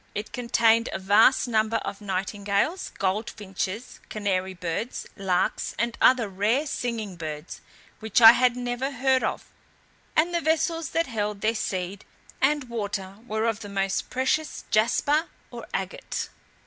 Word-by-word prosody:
It 210 +1 -4
contained 230 -1 +3
a - - -2
vast 205 +8 +4
number 220 -1 +1
of 200 - -6
nightingales, 200 - -1
gold 200 +4 0
finches, 205 +2 -5
canary 190 -3 -1
birds, 180 +7 -4
larks, 190 -3 0
and 235 +1 -1
other 250 -4 +5
rare 210 +9 +1
singing 230 - -3
birds, 155 0 -6 0.4
which 220 0 +1
I 225 -1 +12
had 250 0 +2
never 245 +2 -2
heard 265 -1 +1
of; - - -2 0.7
and 335 +3 +3
the 340 - +1
vessels 325 +1 0
that 330 0 +1
held 210 -5 -3
their 220 +1 +2
seed 190 -2 -3 0.4
and 290 +1 +3
water 205 -4 -4
were 220 -1 -1
of 225 -2 0
the 205 - -8
most 195 -1 -1
precious 265 +4 -1
jasper 245 +9 +2 0.2
or - - -8
agate. - - -4
220 Hz, 145 wpm, -26 LUFS, 200-250 Hz, 0.7 s, I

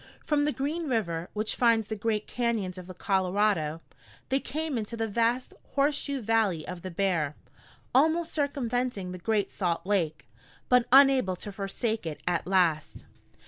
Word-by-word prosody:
From 295 -1 +2
the 300 - +2
Green 300 +4 -2
River, 170 -8 -1
which 215 +1 -2
finds 230 -3 +3
the 220 - -3
great 215 0 -1
cañons 220 -7 -1
of 180 - -10
the 185 - -9
Colorado, 185 -4 +1 0.5
they 270 - +2
came 305 +2 -3
into 230 0 -3
the 225 0 -1
vast 235 +4 0 0.2
horseshoe 280 -1 +1
valley 215 -7 +1
of 180 -1 -6
the 185 - -5
Bear, 170 -5 0 0.6
almost 320 +5 +3
circumventing 250 - -1
the 180 - -7
Great 210 +2 0
Salt 175 -3 -1
Lake, 165 -9 -1 0.4
but 250 -1 +4
unable 265 -8 +6
to 205 +3 -7
forsake 200 +1 -3
it 155 - -6
at 175 -1 0
last. 170 -6 +1
215 Hz, 155 wpm, -28 LUFS, 185-255 Hz, 0.6 s, unable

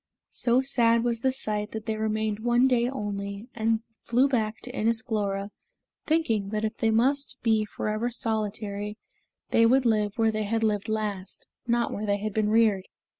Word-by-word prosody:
So 245 +1 +2
sad 235 -3 +3
was 235 -1 0
the 265 - +2
sight 210 -5 -3
that 220 0 -5
they 220 -1 -1
remained 215 -1 -1
one 240 +3 +3
day 245 -1 +2
only, 205 -3 -5
and 225 0 0 0.2
flew 245 +4 +3
back 220 -5 -1
to 250 +1 -8
Inis 225 -1 +1
Glora, 200 -3 -2 0.6
thinking 230 -11 +1
that 215 +1 -1
if 215 - -3
they 225 - +1
must 265 +6 +1
be 220 -2 +3
forever 215 +3 -2
solitary, 210 -2 -3 0.5
they 230 0 +5
would 260 +2 +3
live 210 -3 +2
where 225 -1 +3
they 215 -1 -2
had 225 +2 0
lived 210 0 0
last, 205 -3 -3 0.2
not 235 0 +1
where 210 +1 -4
they 200 0 +2
had 210 0 -4
been 215 0 +1
reared. 215 -4 +3
220 Hz, 175 wpm, -27 LUFS, 210-235 Hz, 0.6 s, they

